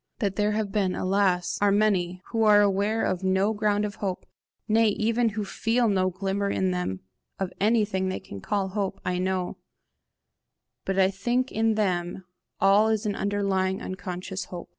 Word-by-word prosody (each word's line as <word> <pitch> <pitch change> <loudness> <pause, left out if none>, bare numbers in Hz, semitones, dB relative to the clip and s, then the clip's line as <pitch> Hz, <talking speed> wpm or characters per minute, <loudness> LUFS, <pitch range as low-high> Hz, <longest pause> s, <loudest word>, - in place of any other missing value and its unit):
That 200 -5 -1
there 210 +1 +1
have 210 -2 -2
been, 195 -3 0
alas, 185 -2 +1
are 205 -1 +4
many, 185 -4 +1
who 225 - 0
are 210 -1 +6
aware 205 +2 +1
of 185 0 -1
no 190 +3 +2
ground 210 -1 +1
of 205 - -6
hope, 190 -3 -3 0.4
nay 225 +1 +4
even 225 +3 +1
who 210 - -1
feel 230 +4 0
no 190 -3 +2
glimmer 195 +2 -2
in 190 -1 0
them 180 - -3 0.4
of 190 -2 -3
anything 205 -3 +2
they 185 - -3
can 100 - -10
call 195 - -1
hope, 195 -1 -3
I 180 0 -1
know; 185 -1 -2 1.3
but 195 0 -1
I 190 0 +4
think 240 +6 -1
in 220 0 +1
them 185 -3 -1 0.3
all 200 +3 +5
is 220 0 0
an 205 -1 -1
underlying 195 -2 0
unconscious 185 0 -5
hope. 175 -1 -8
195 Hz, 170 wpm, -26 LUFS, 185-210 Hz, 1.3 s, are